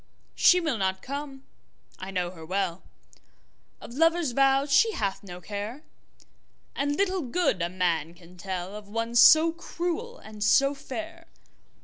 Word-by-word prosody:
She 360 - +5
will 310 -10 -2
not 190 -1 -1
come, 280 -1 -6 0.6
I 190 - -7
know 180 -2 -2
her 165 -3 -12
well, 185 +1 -2 1.0
Of - - -11
lover's 330 0 +2
vows 275 +2 +2
she 450 +6 +4
hath 200 - -2
no 180 -3 -10
care, 210 - -6 0.9
And 285 +1 -1
little 380 0 0
good 255 - 0
a 170 - -1
man 170 -3 -1
can 175 0 -17
tellOf 190 +3 -6
one 230 +3 -4
so 315 +7 +7
cruel 345 +8 -5
and 215 - -8
so 275 +6 +4
fair. 325 +5 -8
235 Hz, 140 wpm, -26 LUFS, 190-315 Hz, 1.0 s, so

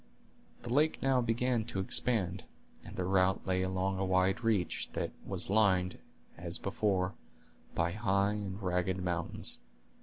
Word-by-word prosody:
The 120 - -3
lake 155 +3 +3
now 135 -2 +3
began 120 0 +1
to 110 -4 -3
expand, 95 -2 0 0.4
and - - -10
their 90 - -1
route 95 0 +2
lay 95 -1 +1
along 95 +1 0
a - - +1
wide 95 +3 +2
reach, 105 -7 0
that - - -2 0.2
was - - 0
lined, 95 -4 +3 0.4
as 85 +1 -1
before, 95 -1 0 0.6
by 85 +1 +1
high 100 +1 +1
and 100 -2 -4
ragged 90 0 0
mountains. 85 -2 -2
95 Hz, 145 wpm, -33 LUFS, 95-110 Hz, 0.6 s, lake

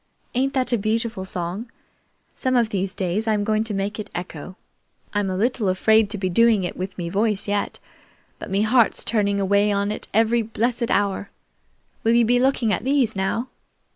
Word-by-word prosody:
Ain't 270 +2 0
that 255 -2 +1
a 235 - +2
beautiful 220 -1 -1
song? 185 +5 -4 0.6
Some 255 0 -1
of 235 -3 +3
these 190 -2 -2
days 195 +4 -1
I'm 210 -2 +1
going 215 +1 +1
to 220 - -3
make 200 +2 -3
it 210 - -6
echo. 175 0 -6 0.6
I'm 205 -2 0
a 185 - -2
little 225 -1 +1
afraid 220 +3 +3
to 210 - -2
be 190 -1 -1
doing 220 +2 +4
it 175 - -3
with 185 +1 -5
me 175 -2 -3
voice 205 +3 0
yet, 205 0 -1 0.6
but - - -7
me 195 +2 +1
heart's 235 +1 +3
tuning 200 -3 +1
away 200 +1 +2
on 200 0 0
it 215 - -5
every 225 +2 +3
blessed 230 +2 -1
hour. 200 0 0 0.7
Will 225 - +3
you 235 -1 +5
be 245 +2 +3
looking 250 -4 +2
at - - -2
these 265 -4 +1
now?" 195 +6 -1
210 Hz, 190 wpm, -23 LUFS, 195-230 Hz, 0.7 s, you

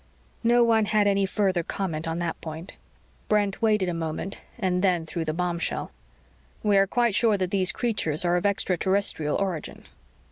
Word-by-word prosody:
No 240 +1 +5
one 225 -2 +3
had 210 0 +2
any 200 -1 +2
further 190 -3 +1
comment 165 -2 -4
on 165 0 -2
that 170 -1 -3
point. 160 +3 -7 0.5
Brent 205 -1 +1
waited 210 -4 +2
a 175 - -1
moment 165 +3 -4 0.2
and 185 -5 0
then 180 -4 +2
threw 165 +1 -4
the 155 - -2
bombshell. 170 +1 -2 0.7
"We 205 -1 +3
are 195 0 +4
quite 235 +1 +1
sure 220 0 +3
that 185 -2 -2
these 190 -2 +3
creatures 180 -10 -1
are 175 0 +2
of 180 - 0
extraterrestrial 190 -5 0
origin." 185 -6 -3
190 Hz, 170 wpm, -25 LUFS, 170-205 Hz, 0.7 s, No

